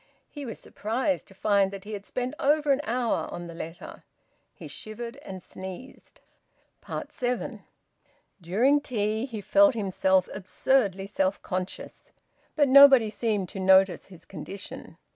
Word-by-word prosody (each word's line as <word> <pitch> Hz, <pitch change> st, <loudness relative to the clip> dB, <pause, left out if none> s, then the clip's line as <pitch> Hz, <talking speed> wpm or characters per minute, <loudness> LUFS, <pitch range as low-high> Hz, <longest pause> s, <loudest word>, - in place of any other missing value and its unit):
He 290 Hz, -3 st, -7 dB
was 225 Hz, -, -6 dB
surprised 255 Hz, +7 st, -2 dB
to 195 Hz, -, -16 dB
find 200 Hz, -1 st, +2 dB
that 195 Hz, -1 st, -9 dB
he 215 Hz, +1 st, -8 dB
had 200 Hz, -1 st, -7 dB
spent 255 Hz, +1 st, -3 dB
over 295 Hz, 0 st, +2 dB
an 275 Hz, +1 st, +2 dB
hour 240 Hz, 0 st, -1 dB
on 175 Hz, -, -6 dB
the 170 Hz, -, -9 dB
letter. 175 Hz, -, -9 dB, 0.5 s
He -, -, -11 dB
shivered 230 Hz, +1 st, -8 dB
and 190 Hz, -2 st, -9 dB
sneezed. 190 Hz, +8 st, -10 dB, 0.9 s
SEVEN. 245 Hz, 0 st, -3 dB, 0.8 s
During 240 Hz, -, +2 dB
tea 220 Hz, -2 st, -1 dB
he 225 Hz, -5 st, -6 dB
felt 295 Hz, +6 st, +4 dB
himself 190 Hz, -3 st, +1 dB
absurdly 195 Hz, 0 st, 0 dB
self 195 Hz, -1 st, -1 dB
conscious, 185 Hz, 0 st, -5 dB, 0.4 s
but 290 Hz, -2 st, +4 dB
nobody 270 Hz, -5 st, +8 dB
seemed 210 Hz, -4 st, -1 dB
to 195 Hz, -, -7 dB
notice 190 Hz, 0 st, +4 dB
his 180 Hz, -4 st, -15 dB
condition. 190 Hz, +2 st, -9 dB
215 Hz, 140 wpm, -27 LUFS, 190-260 Hz, 0.9 s, nobody